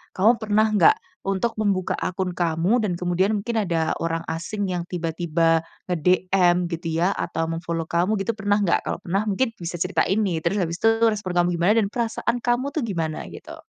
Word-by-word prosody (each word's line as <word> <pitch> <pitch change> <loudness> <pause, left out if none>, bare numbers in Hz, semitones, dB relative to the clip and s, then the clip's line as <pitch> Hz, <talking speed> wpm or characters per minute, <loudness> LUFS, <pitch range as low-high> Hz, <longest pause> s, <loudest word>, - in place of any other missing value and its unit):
kamu 225 +5 +4
pernah 215 0 +3
nggak, 185 -6 +5 0.3
untuk 195 +4 -1
membuka 200 -4 0
akun 180 -1 -3
kamu, 175 +7 +1
dan 180 -4 -1
kemudian 180 +3 +1
mungkin 220 +3 -2
ada 165 -3 0
orang 165 0 -2
asing 190 +5 -3
yang 175 -2 -2
tiba-tiba 165 -1 0 0.2
nge-DM 180 +1 +2
gitu, 165 -1 -3
ya, 180 +3 +2
atau 165 0 -2
mem-follow 165 0 -3
kamu, 185 +5 +1
gitu 210 +3 -1
pernah 205 0 +1
nggak? 190 -4 +1
Kalau - - -3
pernah, 195 +4 -1
mungkin 225 +3 -1
bisa 175 -3 -6
ceritain 195 +3 +1
nih. 175 -6 -1
Terus 195 +4 0
habis 170 -2 -1
itu 225 0 +4
respon 210 -4 -1
kamu 175 0 +2
gimana, 175 +4 +3
dan 200 - +1
perasaan 235 +2 -2
kamu 255 +4 0
tuh 310 - 0
gimana? 165 -8 -3
Gitu. - - -11
180 Hz, 185 wpm, -23 LUFS, 170-210 Hz, 0.3 s, nggak